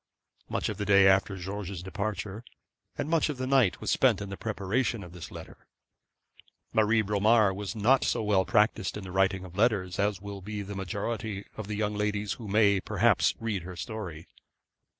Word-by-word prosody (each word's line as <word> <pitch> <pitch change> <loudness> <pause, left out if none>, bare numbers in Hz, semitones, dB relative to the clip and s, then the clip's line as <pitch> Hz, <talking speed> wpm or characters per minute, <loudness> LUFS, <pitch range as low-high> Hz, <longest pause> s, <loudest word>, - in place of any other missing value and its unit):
Much - - -1
of - - -4
the 105 - -2
day 100 -1 +6
after 95 +1 +3
George's 95 -1 -5
departure, 100 +2 -4 0.5
and - - -2
much 160 -1 +2
of 145 - -3
the 130 - -2
night, 130 -7 +3
was - - -2
spent 120 -7 +3
in 100 -1 -6
the 95 - -5
preparation 110 +2 -1
of 90 - -11
this 90 -3 -8
letter. - - -12 1.1
Marie 110 +1 +3
Bromar 105 0 +3
was 100 +3 -5
not 120 +5 +3
so - - 0
well 100 -3 +3
practised 105 +1 +1
in 105 - -7
the 95 - -8
writing 95 0 +1
of 90 -1 -12
letters 100 -4 +1
as 100 -1 +1
will 100 0 -7
be 105 +1 -5
the 100 +1 -7
majority 100 +2 -4
of 110 -2 -6
the 105 - -3
young 105 0 -1
ladies 105 0 -1
who 115 - -9
may, 100 -1 +4
perhaps, - - +2
read 110 -4 -2
her 90 +2 -8
history. 90 -4 -6
100 Hz, 190 wpm, -28 LUFS, 95-110 Hz, 1.1 s, day